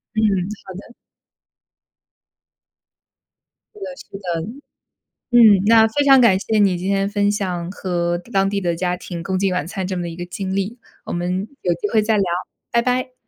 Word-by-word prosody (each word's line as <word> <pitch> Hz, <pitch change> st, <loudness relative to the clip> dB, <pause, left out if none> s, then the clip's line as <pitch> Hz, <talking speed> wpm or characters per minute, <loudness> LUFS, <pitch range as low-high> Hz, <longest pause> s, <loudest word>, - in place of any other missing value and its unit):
嗯， 215 Hz, -, +1 dB, 0.4 s
好 190 Hz, -, -9 dB
的。 200 Hz, +6 st, -11 dB, 2.8 s
是 425 Hz, -, -14 dB
的 -, -, -5 dB
是 195 Hz, -, -11 dB
的。 175 Hz, -2 st, -4 dB, 0.8 s
嗯， 220 Hz, -5 st, +7 dB
那 225 Hz, 0 st, +6 dB
非 285 Hz, +6 st, 0 dB
常 270 Hz, -2 st, +7 dB
感 195 Hz, -6 st, +5 dB
谢 215 Hz, +2 st, 0 dB
你 195 Hz, -3 st, +3 dB
今 180 Hz, +2 st, -4 dB
天 195 Hz, 0 st, +1 dB
分 205 Hz, 0 st, +1 dB
享 180 Hz, -4 st, -3 dB
和 175 Hz, -3 st, -2 dB
当 195 Hz, -2 st, +2 dB
地 200 Hz, 0 st, -2 dB
的 175 Hz, -2 st, 0 dB
家 180 Hz, +1 st, -1 dB
庭 175 Hz, -1 st, -7 dB
共 190 Hz, +1 st, -1 dB
进 195 Hz, 0 st, +1 dB
晚 180 Hz, -5 st, -1 dB
餐 185 Hz, +2 st, -4 dB
这 190 Hz, -, -3 dB
么 175 Hz, -, -3 dB
的 170 Hz, -, -4 dB
一 165 Hz, -, -8 dB
个 175 Hz, +1 st, -6 dB
经 190 Hz, +2 st, -4 dB
历。 200 Hz, +5 st, -2 dB, 0.3 s
我 -, -, -5 dB
们 180 Hz, +3 st, -2 dB
有 175 Hz, -, +1 dB
机 190 Hz, +5 st, -3 dB
会 220 Hz, -, +4 dB
再 220 Hz, +1 st, +2 dB
聊， 200 Hz, -, +2 dB, 0.5 s
拜 235 Hz, -, +3 dB
拜。 255 Hz, +1 st, -1 dB
195 Hz, 200 characters per minute, -20 LUFS, 180-215 Hz, 2.8 s, 嗯